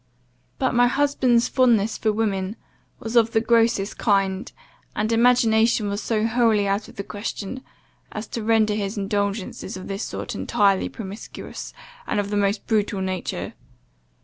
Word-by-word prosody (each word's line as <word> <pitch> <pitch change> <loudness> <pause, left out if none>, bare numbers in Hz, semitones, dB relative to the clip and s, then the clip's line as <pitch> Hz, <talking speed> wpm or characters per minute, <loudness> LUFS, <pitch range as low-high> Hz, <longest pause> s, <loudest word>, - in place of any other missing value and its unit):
But 260 - 0
my 245 0 +5
husband's 260 -3 +2
fondness 230 -5 +3
for 220 - 0
women 205 -2 -1 0.4
was 225 +1 -5
of 230 -1 +4
the 220 - +4
grossest 225 -3 +2
kind, 195 0 +1 0.4
and 215 +2 0
imagination 230 -2 +3
was 200 +1 -2
so 220 -1 0
wholly 225 -3 +2
out 200 +2 -1
of - - -14
the 200 - -4
question, 210 +4 -5 0.5
as 215 +1 -5
to 230 - -4
render 220 -1 +3
his 205 0 -3
indulgences 200 -1 -2
of 185 - -8
this 195 +1 -4
sort - - -5
entirely 200 -4 +1
promiscuous, 205 -1 -8 0.4
and - - 0
of 205 0 -2
the - - 0
most 200 0 0
brutal 210 -3 0
nature. 190 -1 -3
215 Hz, 150 wpm, -23 LUFS, 200-230 Hz, 0.5 s, my